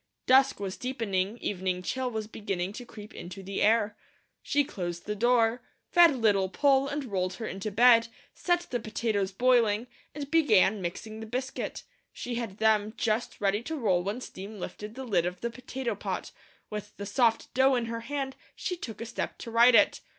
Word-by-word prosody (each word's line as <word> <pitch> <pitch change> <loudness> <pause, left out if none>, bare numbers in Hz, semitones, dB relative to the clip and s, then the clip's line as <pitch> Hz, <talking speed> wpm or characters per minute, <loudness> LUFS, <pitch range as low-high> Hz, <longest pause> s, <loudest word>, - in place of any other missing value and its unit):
Dusk 265 -1 +5
was 195 -1 -4
deepening, 220 -5 -2
evening 185 -2 -2
chill 260 +6 -2
was 220 -2 -3
beginning 195 -3 -4
to 245 +2 -8
creep 210 -2 -11
into 185 +3 -8
the 195 +1 -4
air. 220 0 +3 0.5
She 290 0 +2
closed 175 -8 -5
the 210 - -2
door, 235 +1 +3 0.3
fed 340 -5 +7
Little 205 -5 +2
Poll 275 +4 +3
and 285 0 -3
rolled 185 -4 -2
her 225 - -6
into 195 +1 -4
bed; 230 +2 +6 0.3
set 350 -1 +1
the 245 - 0
potatoes 215 -3 -1
boiling, 230 0 +3 0.3
and 285 -2 -6
began 215 - +4
mixing 215 +5 -5
the 220 - -7
biscuit. 255 +3 -4 0.3
She 245 - -6
had 230 -5 -4
them 215 0 +2
just 225 +1 -1
ready 200 +1 +1
to 320 +7 -4
roll 200 - +2
when 205 +6 -3
steam 205 -1 -8
lifted 210 +4 -7
the 265 0 -6
lid 180 -7 +1
of 180 0 -6
the 235 - -2
potato 255 +1 -4
pot; - - -4 0.4
with 210 -1 -6
the 200 - -5
soft 225 +2 +1
dough 265 +1 +4
in 240 -2 0
her 230 0 -4
hand 270 +2 -4 0.2
she 360 - -3
took 225 - -8
a - - -3
step 235 - -4
to 230 - -8
right 235 +2 +6
it. - - +4
225 Hz, 185 wpm, -28 LUFS, 200-250 Hz, 0.5 s, fed